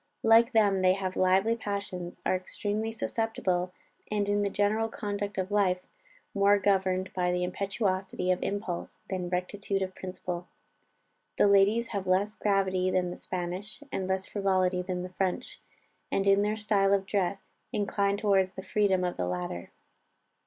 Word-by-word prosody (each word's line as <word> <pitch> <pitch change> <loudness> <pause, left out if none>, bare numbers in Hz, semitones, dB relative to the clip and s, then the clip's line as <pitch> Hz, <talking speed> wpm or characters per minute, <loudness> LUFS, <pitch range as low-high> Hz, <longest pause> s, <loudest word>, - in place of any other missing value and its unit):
Like 230 +2 +6
them 200 -4 +4
they 185 0 +5
have 190 -1 -3
lively 190 +5 +3
passions, 200 -5 -5
are - - +3
extremely 205 +4 -3
susceptible, 195 -5 -1 0.4
and 205 -1 0
in 205 0 +2
the 200 - +1
general 210 +3 +1
conduct 205 -2 -4
of 190 +1 -2
life 185 -3 +2 0.5
more 200 0 +5
governed 190 -1 +1
by 180 -1 +1
the 180 0 0
impetuosity 190 -1 -1
of 180 - 0
impulse 200 -4 -4
than 180 -2 -2
rectitude 195 +2 -2
of 190 0 -5
principle. 180 -1 -5 0.9
The - - +5
ladies 200 +4 +4
have 200 -3 -3
less 195 +3 +2
gravity 190 -2 +1
than 180 -1 +1
the - - -5
Spanish, 185 +8 -5
and 190 - -2
less 190 0 0
frivolity 185 -2 +1
than 180 -1 -3
the 180 - -6
French, 185 0 -3 0.5
and 195 - +1
in 195 0 +5
their 210 +1 0
style 200 -2 +3
of 195 -1 -2
dress 195 -1 -1 0.3
incline 200 -1 0
towards 195 -3 +2
the 190 - -7
freedom 195 -3 +2
of 180 -1 -2
the 90 - -1
latter. 90 -1 -4
195 Hz, 160 wpm, -29 LUFS, 185-205 Hz, 0.9 s, Like